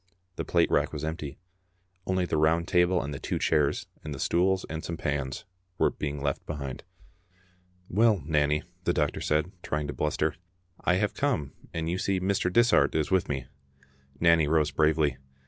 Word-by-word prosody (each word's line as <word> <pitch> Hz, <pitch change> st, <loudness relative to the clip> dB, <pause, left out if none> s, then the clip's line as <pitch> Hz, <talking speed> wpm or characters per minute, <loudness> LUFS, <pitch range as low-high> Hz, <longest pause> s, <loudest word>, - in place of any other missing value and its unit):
The -, -, -3 dB
plate -, -, +2 dB
rack -, -, +2 dB
was 75 Hz, 0 st, -4 dB
empty. 75 Hz, -3 st, -5 dB, 0.7 s
Only 95 Hz, -1 st, +1 dB
the 85 Hz, -, -1 dB
round 80 Hz, +2 st, +2 dB
table 90 Hz, -1 st, +3 dB
and 70 Hz, +1 st, -4 dB
the 70 Hz, -, -5 dB
two -, -, -2 dB
chairs, 75 Hz, -3 st, +1 dB, 0.2 s
and 75 Hz, -2 st, -5 dB
the -, -, -9 dB
stools 95 Hz, +2 st, +2 dB
and 80 Hz, 0 st, -5 dB
some 85 Hz, -, -4 dB
pans 70 Hz, -4 st, -3 dB, 0.3 s
were -, -, +3 dB
being 70 Hz, -1 st, -4 dB
left 70 Hz, -1 st, -1 dB
behind. 70 Hz, -3 st, -5 dB, 0.6 s
" 90 Hz, 0 st, -35 dB, 0.2 s
Well, 105 Hz, -3 st, +3 dB
Nanny," 75 Hz, 0 st, +2 dB, 0.2 s
the 85 Hz, -, +2 dB
doctor 75 Hz, -3 st, 0 dB
said, 75 Hz, +4 st, +1 dB
trying 75 Hz, -3 st, -2 dB
to 70 Hz, -, -4 dB
bluster, 75 Hz, +1 st, 0 dB, 0.3 s
" 90 Hz, 0 st, -29 dB
I 90 Hz, -, +3 dB
have 105 Hz, +3 st, 0 dB
come, 125 Hz, -, -1 dB, 0.2 s
and 80 Hz, 0 st, -3 dB
you 90 Hz, +2 st, -1 dB
see 95 Hz, -1 st, 0 dB
Mr. 95 Hz, -1 st, 0 dB
Dishart 120 Hz, +2 st, +4 dB
is 80 Hz, +2 st, 0 dB
with 95 Hz, -1 st, +2 dB
me." 65 Hz, -3 st, -2 dB, 0.7 s
Nanny 85 Hz, -2 st, +5 dB
rose 75 Hz, -2 st, +2 dB
bravely. 75 Hz, -3 st, +2 dB
80 Hz, 180 wpm, -28 LUFS, 75-90 Hz, 0.7 s, Nanny